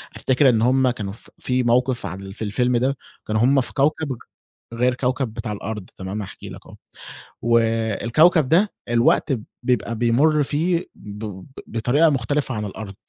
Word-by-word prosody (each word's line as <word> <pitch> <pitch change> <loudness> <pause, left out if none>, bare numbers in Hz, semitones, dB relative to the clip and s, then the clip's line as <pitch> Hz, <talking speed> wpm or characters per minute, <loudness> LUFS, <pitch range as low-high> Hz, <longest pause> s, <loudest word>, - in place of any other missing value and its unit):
أفتكر 130 +1 +3
إن 115 -3 +2
هُم 130 +2 +3
كانوا 105 -5 -4
ف 110 - -14
في 125 0 0
مَوقِف 125 +1 +1
عال 95 +2 -7
في 110 - -5
الفيلم 125 +4 +1
ده، 130 +3 0 0.3
كانوا 110 0 0
هُم 135 +3 +4
في 120 - -5
كوكب 145 -1 0 0.6
غير 125 +2 +2
كوكب 125 -2 -1
بتاع 115 -1 -5
الأرض 105 -1 -6
تمام، 95 +3 -5
هاحكي 100 - -9
لَك - - -11
أهو، - - -13 0.7
والكوكب 115 - +3
ده 190 +6 +3 0.2
الوقت 120 +3 +3
ب 115 -5 -3 0.2
بيبقى 120 -2 0
بيمُر 135 +7 +3
فيه 165 +5 0
بب 105 -2 -8 0.2
بطريقة 125 +8 +2
مختلفة 135 0 -1
عن 105 -1 -3
الأرض. 100 0 -7
120 Hz, 160 wpm, -22 LUFS, 110-135 Hz, 0.7 s, هُم